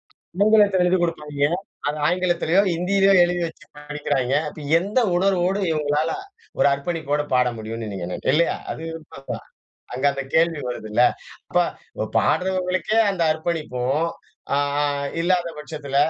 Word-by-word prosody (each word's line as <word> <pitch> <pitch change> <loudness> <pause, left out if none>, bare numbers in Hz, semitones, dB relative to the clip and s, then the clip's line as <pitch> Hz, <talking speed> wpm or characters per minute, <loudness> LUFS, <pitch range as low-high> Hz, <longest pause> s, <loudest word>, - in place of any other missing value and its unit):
ஆங்கிலத்தில 200 0 +3
எழுதிக் 180 0 +2
குடுப்பாய்ங்க. 150 -4 0 0.4
அதை 150 +1 0
ஆங்கிலத்திலையோ, 180 0 +2
ஹிந்தியிலையோ 195 +3 +3
எழுதி 175 0 +1
வைச்சு 160 -1 -7
படிக்கிறாய்ங்க. 145 -3 -1 0.4
எந்த 205 +8 -1 0.2
உணர்வோடு 190 0 +2
இவங்களால 150 +1 0 0.5
ஒரு - - +4
அர்ப்பணிப்போடு 150 0 -1
பாட 125 0 +4
முடியும்னு 110 0 -5
நீங்க 90 -3 -4
நினைக்கிற 130 - 0
இல்லையா? 170 +1 +2 0.2
அது. 160 - -7 1.1
அங்க 130 +3 -4
அந்த 140 - -4
கேள்வி 165 -2 +3
வருதுல்ல. 110 -1 0 0.5
அப்ப - - +4 0.6
பாடுறவங்களுக்கே 185 +2 +1
அந்த 185 -3 -1
அர்ப்பணிப்பும் 155 -2 -1 0.5
அ - - +2 0.6
இல்லாத 175 0 +1
பட்சத்தில 150 -2 -5
165 Hz, 115 wpm, -23 LUFS, 145-180 Hz, 1.1 s, ஒரு